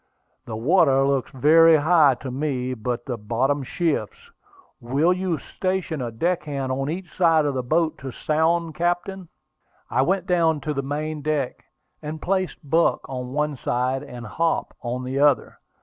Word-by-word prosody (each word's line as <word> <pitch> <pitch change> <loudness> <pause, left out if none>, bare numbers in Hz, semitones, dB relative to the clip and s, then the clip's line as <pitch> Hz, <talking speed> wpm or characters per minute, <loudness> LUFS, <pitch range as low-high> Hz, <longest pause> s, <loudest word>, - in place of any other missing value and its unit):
"The 110 - -6
water 135 +2 +3
looks 135 -2 0
very 160 +5 +6
high 155 -3 +4
to 130 - -5
me, 130 -2 -2
but 120 +1 -4
the 125 -3 -3
bottom 125 +7 0
shifts. 180 - -3 0.5
Will 140 +9 +2
you 180 -2 -1
station 185 -3 -3
a 120 - -2
deck 170 +10 -1
hand 140 -3 -3
on 135 +2 -2
each 175 +3 -6
side 165 -4 +4
of 145 - 0
the 130 - -1
boat 160 +5 0
to 135 - -6
sound, 160 +5 0
captain?" 175 +1 -2 0.6
I - - +2
went 185 +6 +1
down 165 -4 +2
to 150 +2 -2
the 140 - -2
main 150 +2 -4
deck, 145 -3 -2 0.4
and 155 +1 -6
placed 185 -3 -2
Buck 165 +4 +2
on 125 -1 -5
one 150 0 0
side, 125 +2 -1
and 125 -4 -9
Hop 165 +10 -1
on 125 +1 -3
the 130 +2 -3
other. 145 -4 +2
150 Hz, 165 wpm, -23 LUFS, 130-165 Hz, 0.6 s, very